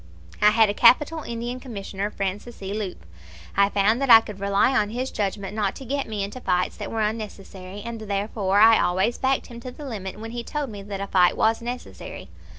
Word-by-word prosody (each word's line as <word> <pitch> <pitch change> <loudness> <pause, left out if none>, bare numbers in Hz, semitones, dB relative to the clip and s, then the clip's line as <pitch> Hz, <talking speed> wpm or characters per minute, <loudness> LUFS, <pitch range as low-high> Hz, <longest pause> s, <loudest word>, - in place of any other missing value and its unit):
I 210 - +7
had 220 0 +5
a 205 - -1
capital 300 +9 +4
Indian 240 0 -5
Commissioner, 205 -5 -5
Francis 200 +3 -5
E. 195 +1 -4
Leupp. 200 - -5 0.5
I 200 0 +4
found 205 +5 +2
that 275 - 0
I 225 -1 +11
could 210 -3 -9
rely 200 +6 +2
on 210 -4 +2
his 250 +4 -3
judgment 200 0 -3
not 205 -3 0
to 270 - -9
get 280 +3 -2
me 210 -2 -3
into 205 +6 -6
fights 180 -3 0
that - - -5
were 225 - -2
unnecessary, 205 -3 -5
and 230 -1 -6
therefore 200 -1 -1
I 225 +1 +7
always 190 +7 +1
backed 265 0 +1
him 235 -1 -10
to 255 - -7
the 285 +4 -10
limit 205 -6 -6
when 225 +1 -7
he 240 0 -5
told 290 -1 -4
me 205 -1 -8
that 195 0 -6
a - - -2
fight 180 -2 +3
was 225 +1 +2
necessary. 245 +1 -7
215 Hz, 215 wpm, -24 LUFS, 200-235 Hz, 0.5 s, I